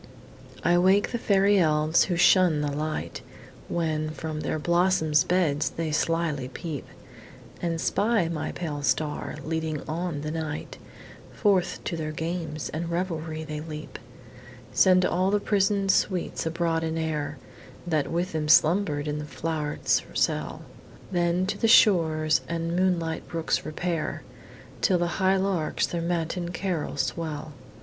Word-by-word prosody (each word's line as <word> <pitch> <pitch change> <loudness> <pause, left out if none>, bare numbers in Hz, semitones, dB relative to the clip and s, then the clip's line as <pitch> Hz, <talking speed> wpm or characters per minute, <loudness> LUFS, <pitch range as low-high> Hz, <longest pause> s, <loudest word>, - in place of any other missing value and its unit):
I 175 0 +4
wake 190 +3 +3
the 235 - -2
fairy 200 -1 +3
elves, 155 -1 +3
who 180 - -1
shun 175 -3 +5
the 145 -1 -1
light; 155 +2 -3 0.5
When, 155 -2 -1
from 155 0 -5
their 155 - -2
blossom'd 170 -3 +2
beds, 170 -5 +1
they 165 -2 -3
slily 155 -4 0
peep, 145 +2 -6 0.7
And 165 -1 -1
spy 210 0 +1
my 165 -3 -3
pale 150 -4 -4
star, 150 +1 -1
leading 160 -2 -2
on 165 -1 -3
the 155 +1 -4
night,— 155 -1 -5 0.5
Forth 195 -4 +1
to 170 - -3
their 155 -1 -3
games 160 -2 -4
and 165 +2 -4
revelry 165 -3 -3
they 150 -1 -5
leap; 155 -1 -8 0.7
Send 185 -1 +5
all 185 +2 +1
the 205 +1 +2
prison'd 200 -1 +2
sweets 185 -4 0
abroad 165 0 0
in 160 0 -2
air, 150 -3 -2 0.5
That 155 -4 0
with 175 +2 -1
them 155 -1 -2
slumber'd 155 -1 +4
in 150 0 -2
the 150 - -5
flow'ret's 150 -1 -1
cell; - - -1 0.5
Then 175 0 +1
to 195 - -3
the 225 - +2
shores 160 -8 +5
and 170 0 -2
moonlight 175 -3 0
brooks 165 -1 -1
repair, 165 +1 -3 0.6
Till 185 - +3
the 175 +2 -2
high 190 +1 +4
larks 190 -5 0
their 170 - -3
matin 170 +1 -2
carol 175 -4 -3
swell. 150 +2 -3
165 Hz, 140 wpm, -26 LUFS, 155-180 Hz, 0.7 s, shun